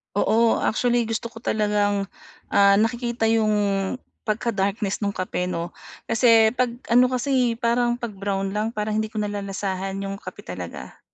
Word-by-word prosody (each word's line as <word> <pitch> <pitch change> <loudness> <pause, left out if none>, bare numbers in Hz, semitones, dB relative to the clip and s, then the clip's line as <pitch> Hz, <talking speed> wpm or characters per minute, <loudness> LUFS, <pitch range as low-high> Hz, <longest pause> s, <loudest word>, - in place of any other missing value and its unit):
Oo, 225 +3 +3
actually 240 +1 +2
gusto 225 +1 -3
ko 230 0 -13
talagang, 205 -1 +1 0.5
ah, 200 0 +6
nakikita 235 0 0
'yung 220 -1 +3 0.7
pagka-darkness 205 -2 -1
nung 200 -1 -2
kape 180 -1 -2
'no, 170 -1 -3 0.4
kasi 225 -1 +5
'pag 250 -1 +1 0.2
ano 245 +1 +7
kasi, 255 -2 +1
eh, - - -17
parang 240 0 +2
'pag 235 -3 -4
brown 195 0 -2
lang 215 +2 0
parang 215 -1 -2
hindi 220 0 -1
ko 220 - -4
nalalasahan 195 -2 -3
'yung 195 0 -4
kape - - -9
talaga. - - -7
215 Hz, 150 wpm, -23 LUFS, 200-235 Hz, 0.7 s, ano